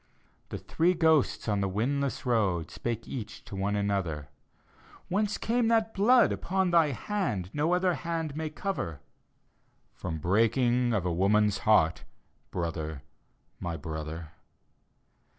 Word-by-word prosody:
The - - -4
three 175 +3 +1
ghosts 160 -7 +2
on 105 -2 +1
the 100 - 0
windless 135 +8 -1
road. 100 -9 +1
Spake 115 -1 -4
each 110 -4 -7
to - - -8
one 100 +2 -1
another, 95 -8 -1 0.4
" - - -25
Whence 210 +2 0
came 235 0 +1
that 225 -1 +2
blood 230 +3 +5
upon 190 0 0
thy 165 -2 +5
hand 125 - -2
No 160 +4 +2
other 180 0 +2
hand 165 -3 -3
may 160 0 -3
cover?" 155 - -4 0.5
" - - -42
From 80 -3 -3
breaking 120 - +2
of 100 -6 0
a 90 - 0
woman's 100 +3 +3
heart, 80 -7 +4 0.5
Brother, 80 -4 -4 0.6
my 85 -2 -3
brother." 80 +1 -6
115 Hz, 135 wpm, -29 LUFS, -, 0.6 s, blood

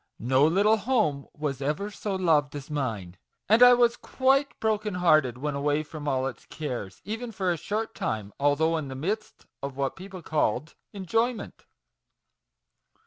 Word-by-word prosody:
No 130 +5 +3
little 205 +6 +4
home 205 - 0
was 145 -3 -4
ever 150 +9 -2
so 205 -1 -4
loved 155 -6 +2
as 145 +1 -7
mine; 110 -11 -3 0.3
and 220 +4 +5
I 245 0 +9
was 240 -1 +3
quite 270 +2 +1
broken 215 -2 0
hearted 155 -9 +3
when 145 +3 -3
away 145 +2 0
from 150 -1 -8
all 130 -2 +1
its 130 -4 -6
cares, 125 -11 -6
even 225 +3 -4
for 190 -4 -1
a - - +1
short 220 +6 -3
time, 105 -2 -3
although 150 +3 +2
in 155 -3 -4
the 130 - -6
midst 210 +10 -4 0.2
of 140 -1 -5
what 135 -1 -1
people 185 -2 -10
called 150 -1 0 0.2
enjoyment. 225 +4 -2
155 Hz, 160 wpm, -27 LUFS, 140-210 Hz, 0.3 s, I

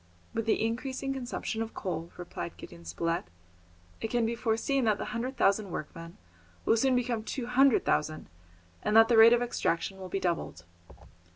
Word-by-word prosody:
"With 225 0 -2
the 220 - +2
increasing 260 +4 -2
consumption 245 -3 -4
of 225 0 -5
coal," 170 -3 -4
replied 175 -1 -6
Gideon 85 0 -12
Spilett, 165 - -2 0.8
"it - - -1
can 240 -1 +1
be 230 - 0
foreseen 235 +3 0
that 215 -2 +3
the - - -4
hundred 250 +3 -3
thousand 200 0 +2
workmen 165 0 -7 0.5
will - - +4
soon 255 +3 +3
become 240 -3 0
two 245 +2 -4
hundred 255 +1 +4
thousand, 155 +1 0 0.5
and 210 - 0
that 225 +1 +7
the 235 - +4
rate 225 +1 +9
of 240 0 +3
extraction 190 -5 -1
will 185 -1 -7
be 195 - -1
doubled." 170 - -2
225 Hz, 175 wpm, -29 LUFS, 180-245 Hz, 0.8 s, rate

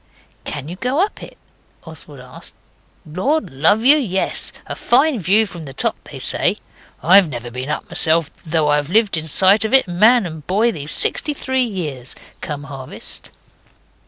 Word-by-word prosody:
'Can 145 -1 -6
you 175 +3 -8
go 250 - -2
up 400 +3 -1
it?' - - -12 0.5
Oswald 155 -4 -11
asked. 125 0 -13 0.5
'Lord 225 - -2
love 165 - +2
you! 290 +3 +7
yes; 195 -10 -1
a - - -6
fine 270 +1 +2
view 205 +5 +3
from 175 -6 -10
the 135 -2 -11
top - - 0
they - - -10
say. - - -1 0.5
I've 185 0 +5
never 120 -2 -7
been 130 +3 -6
up - - -4
myself, 160 -1 +1
though 160 -2 0
I've 145 0 0
lived 215 +1 +2
in 160 0 -3
sight 190 +6 +5
of 220 +4 +2
it, 265 - +5
boy 180 - -9
and 175 - -6 0.3
man, 160 -3 -8 0.3
these 145 -3 -7
sixty 295 - 0
three 260 -1 0
years 150 - -6 0.3
come 145 -2 -6
harvest. 135 -2 -9
170 Hz, 170 wpm, -18 LUFS, 145-220 Hz, 0.5 s, you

